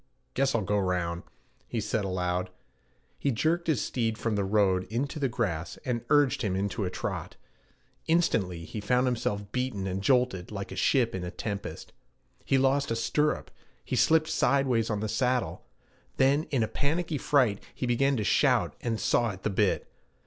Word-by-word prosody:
Guess 135 0 +1
I'll 110 - +1
go 105 +2 +1
round,' 90 -3 -1 0.5
he 115 - -2
said 105 0 -1
aloud. 90 -1 -1 0.7
He 140 - 0
jerked 160 +8 0
his 150 -9 +1
steed 115 -3 -1
from 115 -2 -1
the 100 - +1
road 95 -2 +2
into 130 - -3
the 135 -2 +1
grass, 95 -9 -2
and 120 -3 -1
urged 145 -3 +4
him 100 -6 0
into 100 +2 -1
a - - -1
trot. - - -4 0.7
Instantly 100 - +1
he 105 - -6
found 125 +5 +2
himself 105 -5 -2
beaten 125 -6 -2
and 95 0 -2
jolted 125 -6 +2
like 100 -2 -6
a - - -5
ship 115 +5 +2
in 95 - -3
a 90 - -3
tempest. 100 +3 -6 0.5
He 135 - +2
lost 135 +1 +2
a 115 - 0
stirrup, 150 +6 0 0.3
he - - -2
slipped 160 -1 +4
sidewise 130 -7 +2
on 105 -2 -1
the 110 - -1
saddle; 125 +3 -1 0.5
then 140 +4 +3
in 130 -5 0
a - - 0
panicky 155 +3 -1
fright 125 -9 +2
he - - -3
began 135 +3 +2
to 110 - -1
shout - - +2
and 115 -2 -2
saw 120 -1 +2
at 95 -2 -8
the 105 - 0
bit. 100 0 +1
115 Hz, 180 wpm, -28 LUFS, 100-135 Hz, 0.7 s, urged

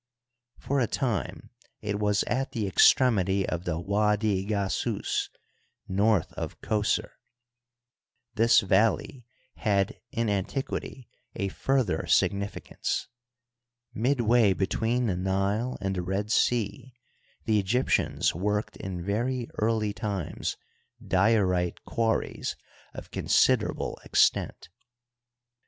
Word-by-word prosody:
For 140 0 -1
a 120 - +2
time 120 -6 -3 0.3
it 105 -1 -3
was 105 -1 +2
at 135 +2 -2
the 110 -3 -1
extremity 95 -2 +4
of 85 +1 -3
the 85 -2 -1
Widi 105 +1 +1
Gasiis, 100 -2 -1 0.6
north 100 -1 +1
of - - -6
Qos6r. 105 -1 0 1.2
This 115 0 +5
valley 110 +5 +1 0.3
had 100 -4 0
in 115 -1 -1
an 100 -2 0
tiquity 135 -1 -5 0.3
a 100 -3 -2
further 130 -8 0
significance. 100 +1 0 0.8
Midway 120 -3 +3
between 115 +6 0
the 95 -6 0
Nile 100 +6 -1
and 95 0 -2
the 90 - -1
Red 95 +4 -2
Sea 120 +2 0 0.5
the 110 -2 +3
Egyptians 115 +7 +1
worked 105 +5 -2
in 90 -2 -6
very 120 +4 -1
early 110 -1 +1
times 100 -6 -3 0.4
diorite 95 -3 +2
quarries 115 -1 -1 0.4
of - - -9
considerable - - +1
extent. - - +1
105 Hz, 105 wpm, -27 LUFS, 95-115 Hz, 1.2 s, This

